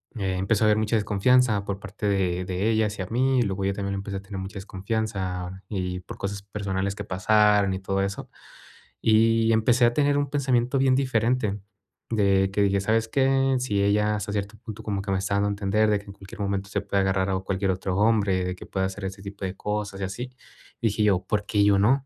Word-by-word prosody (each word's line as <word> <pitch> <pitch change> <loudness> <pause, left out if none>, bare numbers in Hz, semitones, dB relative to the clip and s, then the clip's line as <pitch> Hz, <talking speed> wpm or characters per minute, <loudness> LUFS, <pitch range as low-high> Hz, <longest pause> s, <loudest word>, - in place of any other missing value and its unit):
empezó 95 +1 0
a - - +5
haber 105 0 +4
mucha 110 +1 0
desconfianza, 105 +1 +3
por 100 -1 -3
parte 100 +2 -5
de 90 -2 0
de 95 +4 -1
ella 110 0 +2
hacia 100 -3 -4
mí, 130 +4 +2
y - - +4
luego 100 -3 -1
yo 100 - +1
también 100 0 -3
le - - -2
empecé 100 0 -4
a 95 - -6
tener 100 -1 -7
mucha 95 +1 -6
desconfianza, 95 -2 -3
y 90 -3 -3
por 90 - -10
cosas 100 0 -4
personales 100 -1 -3
que 100 - -5
pasaron, 105 +1 +3
y 95 - -3
todo 95 0 -1
eso. 100 0 -4 0.7
Y 115 +1 +4
empecé 120 +3 +3
a 120 - +3
tener 145 +1 +2
un 145 -1 0
pensamiento 130 -2 +1
bien 130 -1 +4
diferente, 115 -5 +1 0.5
de 100 -3 +2
que 100 - 0
dije: 100 0 +2
"¿Sabes 110 +2 +1
qué?, 135 +1 +2
si 105 -6 0
ella, 105 +1 +2
hasta 105 0 -4
cierto 105 +1 -3
punto, 110 -1 -9
como 100 -2 -2
que 100 - -7
me 95 - +1
está 100 +1 -1
dando 100 0 +2
a - - -1
entender, 100 +2 +1
de 105 - +3
que 100 - -16
en - - -8
cualquier 95 0 -11
momento, 100 0 -2
se 100 - -1
puede 100 -1 0
agarrar 95 0 +1
a 95 - +1
un 95 - -6
cualquier 95 0 0
otro 95 0 -2
hombre, 105 -4 +2
de 90 0 -3
que - - -11
pueda 95 -1 -1
hacer 95 +1 -6
ese 95 +1 -6
tipo 100 0 -6
de 95 0 -4
cosas, 105 -1 -3
y - - -1
así". 120 +7 -5 0.5
Dije 110 -2 0
yo: 95 -3 +2
"¿Por 105 -1 -1
qué 105 -2 +2
yo 100 -1 +4
no? 130 +7 +3
100 Hz, 230 wpm, -25 LUFS, 95-110 Hz, 0.7 s, a